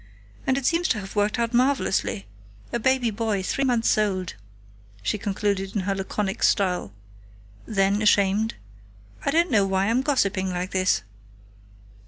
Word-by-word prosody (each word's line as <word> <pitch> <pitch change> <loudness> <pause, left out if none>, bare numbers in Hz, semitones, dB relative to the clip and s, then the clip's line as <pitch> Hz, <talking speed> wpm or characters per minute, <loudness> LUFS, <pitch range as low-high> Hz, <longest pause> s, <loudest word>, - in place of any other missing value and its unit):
And 265 - +2
it 275 - -3
seems 335 +4 +2
to 225 - 0
have 195 +1 -9
worked 205 +2 +1
out 235 0 -1
marvelously.... 250 - +1 0.5
A 235 - 0
baby 255 -1 +2
boy 215 -2 -1
three 275 - -1
months 240 -3 +2
old," 190 -4 -1 0.7
she 155 - -1
concluded 200 -1 -2
in 205 - +1
her 195 +1 -1
laconic 195 +1 -3
style. 180 - +1 0.8
Then, 200 0 +1
ashamed; 205 +1 +3 0.7
"I - - 0
don't 330 +3 +2
know 205 -4 +3
why 195 +2 +1
I'm 245 +3 +2
gossiping 200 -9 +1
like 180 +1 -3
this!" 185 - +1
205 Hz, 150 wpm, -24 LUFS, 195-235 Hz, 0.8 s, ashamed